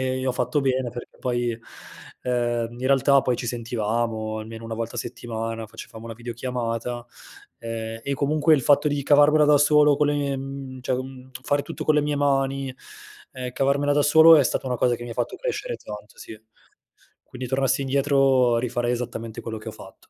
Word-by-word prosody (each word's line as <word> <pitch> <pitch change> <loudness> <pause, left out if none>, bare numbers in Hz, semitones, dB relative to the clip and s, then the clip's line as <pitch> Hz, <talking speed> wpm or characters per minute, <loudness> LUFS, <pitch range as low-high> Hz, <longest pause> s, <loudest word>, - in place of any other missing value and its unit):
e 130 0 -1
ho 130 - +2
fatto 125 +3 0
bene, 130 -2 0
perché 120 - -10
poi 120 -2 -1 0.6
ehm, 120 -2 0
in 125 +2 -5
realtà, 140 +1 +4
poi 125 - +1
ci 120 - -5
sentivamo 115 -2 -2
almeno 115 +1 -8
una 115 0 -5
volta 115 +1 -4
a 120 - -4
settimana, 115 -1 -5
facevamo 110 +1 -11
una 115 -1 -7
videochiamata, 120 0 -4 0.5
ehm, 115 -1 -5
e 140 - -1
comunque 150 +3 +3
il 135 - 0
fatto 145 +2 +4
di 145 -1 0
cavarmela 145 +2 +5
da 150 0 +5
solo 150 0 +5
con 150 - +2
le 145 - +1
mie 135 -2 -4
cioè, 130 - 0
mhmm, 130 0 -7
fare 145 +1 +1
tutto 165 - -7
con 155 - +3
le 150 - +4
mie 150 0 -1
mani, 135 -1 0 0.6
ehm, 125 -1 -5
cavarmela 140 +3 +1
da 145 - +3
solo, 160 +2 +8
è 145 - +4
stata 130 - -1
una 125 - -1
cosa 120 +1 +2
che 120 - -8
mi 120 - -7
ha - - -6
fatto - - -2
crescere - - -3
tanto, 105 0 -10
sì. 110 -1 -11 0.8
Quindi 125 -1 -7
tornassi 135 0 +1
indietro, 135 -3 +3
rifarei 120 0 -1
esattamente 115 -2 -5
quello 110 -1 -6
che 105 - -8
ho - - -6
fatto. - - -13
130 Hz, 190 wpm, -24 LUFS, 115-140 Hz, 0.8 s, solo